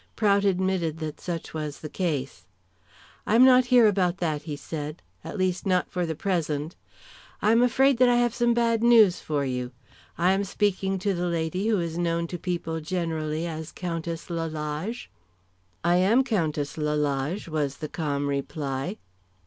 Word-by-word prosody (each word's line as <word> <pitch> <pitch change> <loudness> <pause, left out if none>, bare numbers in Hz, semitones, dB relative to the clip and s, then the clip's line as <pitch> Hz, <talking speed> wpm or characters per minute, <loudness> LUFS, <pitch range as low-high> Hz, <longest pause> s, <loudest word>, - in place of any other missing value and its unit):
Prout 200 -2 +3
admitted 185 -4 0
that 155 -2 -6
such 170 -2 -5
was 150 -2 -5
the 155 - -5
case. 150 -6 -3 0.8
"I 215 - +3
am 250 +3 +8
not 255 -1 +6
here 245 -1 +6
about 190 -4 +2
that," 155 -5 -1
he 150 -1 -5
said, 150 +2 -6 0.2
"at - - -6
least, 185 -1 0
not 185 -2 +1
for 180 -2 -1
the 160 - -3
present. 160 -3 -2 0.6
I 215 - +3
am 230 +1 +5
afraid 255 +1 +3
I 245 -1 +6
have 240 -1 +2
some 240 -1 +2
bad 230 -1 +2
news 225 -6 +6
for 145 -2 -2
you. 125 -1 -3 0.5
I 180 +2 +3
am 195 +1 +1
speaking 195 -1 0
to 195 +1 0
the 175 0 -1
lady 170 +4 -1
who 215 -4 +2
is 170 0 -3
known 170 -1 0
to 175 - -5
people 165 -2 -3
generally 160 -2 -2
as 160 -1 -5
Countess 170 -1 -5
Lalage." 160 +6 -4 0.8
"I 175 +1 +3
am 215 +8 +4
Countess 155 - -1
Lalage," 150 +3 -1
was 150 -4 -2
the 155 - -5
calm 145 -3 -2
reply. 140 +4 -3
170 Hz, 165 wpm, -26 LUFS, 155-200 Hz, 0.8 s, am